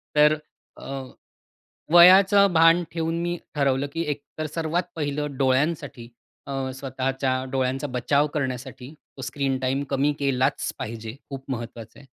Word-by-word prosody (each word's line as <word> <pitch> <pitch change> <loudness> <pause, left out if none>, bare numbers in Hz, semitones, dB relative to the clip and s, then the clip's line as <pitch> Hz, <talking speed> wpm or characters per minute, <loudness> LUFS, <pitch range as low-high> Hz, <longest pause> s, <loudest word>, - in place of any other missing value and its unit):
तर 150 +1 +6 0.4
अ, - - -11 1.1
वयाचं 190 +2 +7
भान 165 +2 +5
ठेवून 165 0 -2
मी 175 0 -2 0.2
ठरवलं 140 -1 +1
की 165 - -2
एक 145 0 -5 0.2
तर 155 - -1
सर्वात 165 +2 0
पहिलं 145 -2 -3
डोळ्यांसाठी 135 -2 0 0.4
अ, 140 - -5 0.2
स्वतःच्या 130 -1 -2
डोळ्यांचा 135 +2 -1
बचाव 140 +4 +1
करण्यासाठी, 130 0 -4 0.2
तो - - -8
स्क्रीन 135 +1 -1
टाईम 130 +2 -1
कमी 140 +2 +2
केलाच 130 -2 0
पाहिजे. 110 +1 -6
खूप 135 -1 -7
महत्वाचं 115 -2 -7
आहे. 140 - -16
140 Hz, 135 wpm, -24 LUFS, 130-155 Hz, 1.1 s, वयाचं